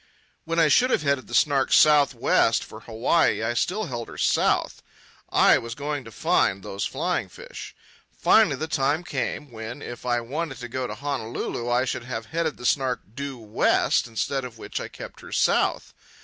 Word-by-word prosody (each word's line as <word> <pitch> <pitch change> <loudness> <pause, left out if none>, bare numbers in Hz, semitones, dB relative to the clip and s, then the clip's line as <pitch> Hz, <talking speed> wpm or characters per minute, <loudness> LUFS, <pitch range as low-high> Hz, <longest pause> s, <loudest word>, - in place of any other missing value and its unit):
When 165 +1 -2
I 165 -2 +5
should 245 - +4
have 150 - +1
headed 140 -2 0
the 120 - -4
Snark 135 0 +3
south 150 -2 +5
west - - +2
for - - -11
Hawaii, 115 +3 +1
I 115 +1 0
still 185 - 0
held 120 - -5
her - - -11
south. - - +1 0.5
I - - +5
was 115 0 -7
going 145 -2 -4
to 115 - -10
find 95 -2 +1
those 100 +1 -4
flying 170 - -2
fish. - - -10 0.3
Finally 210 -10 +4
the 155 +4 -4
time 145 +2 0
came 150 -4 -4
when, 115 +4 -7
if 120 - -8
I 120 -1 +1
wanted 135 +5 -4
to 120 - -5
go 125 +1 -3
to - - -6
Honolulu, 120 -3 -4
I 120 +2 +2
should 120 -1 -3
have 115 -3 -5
headed 165 -2 -1
the 120 - -9
Snark 130 -1 +1
due 140 0 -5
west, 110 +1 +1
instead 135 +4 -2
of 120 -3 -8
which - - -5
I - - -5
kept - - -11
her - - -12
south. - - +1
130 Hz, 190 wpm, -25 LUFS, 120-150 Hz, 0.5 s, I